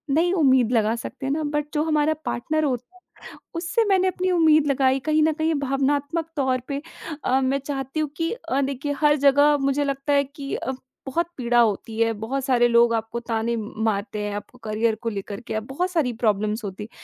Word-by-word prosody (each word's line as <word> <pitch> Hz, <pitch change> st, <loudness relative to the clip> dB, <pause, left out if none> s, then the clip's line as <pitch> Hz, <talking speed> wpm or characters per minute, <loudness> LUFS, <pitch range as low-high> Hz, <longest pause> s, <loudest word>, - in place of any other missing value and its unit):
नहीं 350 Hz, +3 st, +3 dB
उम्मीद 260 Hz, -, +4 dB
लगा 225 Hz, -1 st, +2 dB
सकते 235 Hz, +3 st, -7 dB
हैं 270 Hz, -, 0 dB
ना 310 Hz, +1 st, -1 dB
बट 295 Hz, 0 st, -1 dB
जो 300 Hz, -1 st, +1 dB
हमारा 310 Hz, -1 st, +2 dB
पार्टनर 310 Hz, +6 st, -1 dB
होता 260 Hz, +6 st, -3 dB, 0.4 s
है, -, -, -15 dB, 0.2 s
उससे 340 Hz, +8 st, 0 dB
मैंने 375 Hz, -1 st, +3 dB
अपनी 370 Hz, 0 st, -1 dB
उम्मीद 310 Hz, -3 st, +4 dB
लगाई 270 Hz, -1 st, +3 dB
कहीं 310 Hz, +3 st, +2 dB
न 315 Hz, -, +3 dB
कहीं 315 Hz, +1 st, -1 dB
ये 325 Hz, -, +2 dB
भावनात्मक 285 Hz, +4 st, 0 dB
तौर 260 Hz, -3 st, +1 dB
पे 280 Hz, 0 st, -3 dB, 0.4 s
अ, 260 Hz, +1 st, +2 dB
मैं 265 Hz, +1 st, +1 dB
चाहती 275 Hz, +1 st, -4 dB
हूँ 305 Hz, -, 0 dB
कि 330 Hz, 0 st, -1 dB
अ, 280 Hz, -, -2 dB
देखिए 275 Hz, +1 st, -2 dB
हर 295 Hz, -1 st, +5 dB
जगह 285 Hz, +1 st, +5 dB
मुझे 275 Hz, +1 st, +1 dB
लगता 275 Hz, +1 st, -1 dB
है 280 Hz, 0 st, +4 dB
कि 280 Hz, 0 st, -7 dB
अ, 265 Hz, -, -3 dB, 0.3 s
बहुत 335 Hz, +6 st, 0 dB
पीड़ा 240 Hz, -2 st, +1 dB
होती 220 Hz, 0 st, 0 dB
है। 230 Hz, 0 st, +3 dB
बहुत 230 Hz, +5 st, -3 dB
सारे 245 Hz, -3 st, +3 dB
लोग 235 Hz, 0 st, +5 dB
आपको 225 Hz, +1 st, -2 dB
ताने 230 Hz, 0 st, -1 dB
म 215 Hz, -1 st, -5 dB
मारते 210 Hz, -1 st, -1 dB
हैं 205 Hz, 0 st, -3 dB
आपको 250 Hz, +4 st, -9 dB
करियर 220 Hz, +1 st, +1 dB
को 230 Hz, -, -1 dB
लेकर 200 Hz, -1 st, -5 dB
के 235 Hz, -, -6 dB
आप 220 Hz, -, -1 dB
बहुत 355 Hz, +8 st, -1 dB
सारी 315 Hz, -9 st, +1 dB
प्रॉब्लम्स 215 Hz, +1 st, +1 dB
होती 200 Hz, +1 st, -5 dB
हैं, 220 Hz, -, -13 dB
270 Hz, 215 wpm, -24 LUFS, 235-300 Hz, 0.4 s, हर